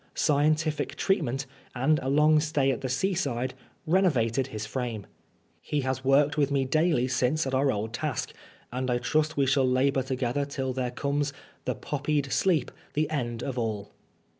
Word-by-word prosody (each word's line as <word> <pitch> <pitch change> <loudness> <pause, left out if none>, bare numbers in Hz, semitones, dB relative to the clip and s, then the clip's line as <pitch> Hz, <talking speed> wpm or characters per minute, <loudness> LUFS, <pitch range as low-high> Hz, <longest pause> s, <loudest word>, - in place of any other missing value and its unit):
Scientific 155 +1 +1
treatment, 135 -9 0 0.3
and 145 +5 +2
a 130 - -3
long 150 +2 +5
stay 150 -3 +1
at 130 - -3
the 130 - -3
seaside, 130 -6 -1 0.3
renovated 135 -9 +2
his 110 -4 -5
frame. 115 -3 -4 0.6
He 150 - -1
has 130 0 -2
worked 140 +3 +3
with 140 -1 +3
me 140 -2 +1
daily 155 -2 +2
since 130 +5 +1
at 135 - -3
our 135 +1 +3
old 110 +1 -3
task, 145 -1 -3 0.4
and 130 +1 -2
I 120 - +2
trust 155 +5 0
we 140 - +3
shall 135 +1 +3
labor 135 +1 +2
together 130 +1 -1
till 135 -2 -3
there 125 -1 -1
comes 140 +3 -1 0.2
" - - -31
The - - -1
poppied 145 -1 -2
sleep, 165 -9 +2 0.2
the 155 +1 0
end 120 -5 -2
of 130 -2 -3
all." 105 -3 -3
135 Hz, 170 wpm, -27 LUFS, 125-150 Hz, 0.6 s, long